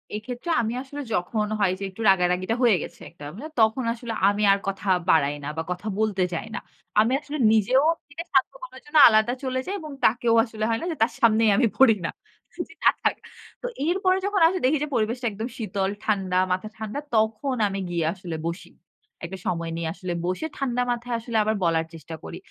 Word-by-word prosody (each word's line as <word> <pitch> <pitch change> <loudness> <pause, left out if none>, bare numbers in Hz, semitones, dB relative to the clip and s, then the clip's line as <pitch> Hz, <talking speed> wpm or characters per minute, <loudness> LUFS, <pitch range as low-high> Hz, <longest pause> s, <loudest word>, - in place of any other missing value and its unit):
এক্ষেত্রে 245 +8 -6
আমি 225 +1 -2
আসলে 285 +2 -7
যখন 210 +3 0
হয় 195 -3 +3
যে, - - -5
একটু 190 +4 -10
রাগা-রাগিটা 185 +3 +2
হয়ে 225 -5 +6
গেছে - - -10
একটা, 165 -3 -15 0.4
তখন 220 +3 +3
আসলে 235 -1 -6
আমি 205 +1 +1
আর 200 - 0
কথা 195 +1 -4 0.2
বাড়াই 145 -2 +4
না - - -5
বা - - 0
কথা 180 +4 -5
বলতে 205 -4 +1
চাই 195 +7 -4
না। - - -2 0.4
আমি 230 +4 +3
আসলে 295 +1 -6
নিজেও 225 +5 +4 0.3
নিজেকে 305 +4 -7
শান্ত - - +3
করার - - -10
জন্য 300 +1 -1
আলাদা 220 +2 +3
চলে 260 0 -1
যাই। 390 - -3
এবং 305 -1 -8
তাকেও 230 0 +3
আসলে 220 -2 -6
হয় 225 - +1
না - - -3
যে - - -3
তার 230 - +1
সামনেই 225 -1 +5
আমি 245 -2 +4
পড়ি 245 -5 +7
না। - - -1 0.6
যে - - -15
না - - +8
থাক। - - +2 0.5
তো - - -3 0.2
এরপরে 370 +1 +2
যখন 400 -3 0
আসলে 370 +1 -1
দেখি 295 +4 +3
যে - - -2
পরিবেশটা 235 +3 -1
একদম 220 +4 -4
শীতল, 200 -4 -2
ঠান্ডা 190 -4 0
মাথা 185 +4 -1
ঠান্ডা 220 +5 -4 0.2
তখন 220 +5 +1
আমি 195 0 -4
গিয়ে 170 -2 -1
আসলে 180 -4 -7
বসি। 170 - -6 0.5
একটা 190 +2 -7
সময় 165 -1 -2
নিয়ে 165 -1 -2
আসলে 180 -2 -5
বসে 185 - -2
ঠান্ডা 250 -3 -1
মাথায় 240 0 -2
আসলে 230 -1 -3
আবার 215 +1 0
বলার 165 -1 +2
চেষ্টা 160 0 -8
করি। - - -7
220 Hz, 205 wpm, -25 LUFS, 190-250 Hz, 0.6 s, না